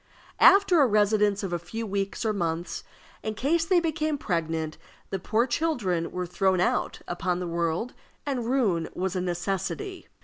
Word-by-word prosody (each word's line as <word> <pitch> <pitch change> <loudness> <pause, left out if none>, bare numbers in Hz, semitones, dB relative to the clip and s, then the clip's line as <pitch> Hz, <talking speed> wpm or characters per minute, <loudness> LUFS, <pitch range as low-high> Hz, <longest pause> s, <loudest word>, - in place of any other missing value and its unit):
After 390 -4 +7
a 275 - +6
residence 210 -1 +2
of 185 -3 -3
a 175 - 0
few 225 +7 -5
weeks 200 +2 -2
or 215 - +2
months, 170 -2 -2 0.4
in 215 0 -3
case 325 +8 +1
they 360 +1 +4
became 310 -2 -1
pregnant, 160 - -2 0.3
the 195 - -1
poor 220 +6 +1
children 240 - 0
were 180 0 -3
thrown 185 +1 +1
out 180 - 0
upon 175 0 -1
the 180 - -3
world, 170 +7 -1 0.3
and 255 -5 -2
ruin 210 -11 +1
was 190 +1 -2
a 180 - 0
necessity. 195 - -3
200 Hz, 165 wpm, -27 LUFS, 175-255 Hz, 0.4 s, After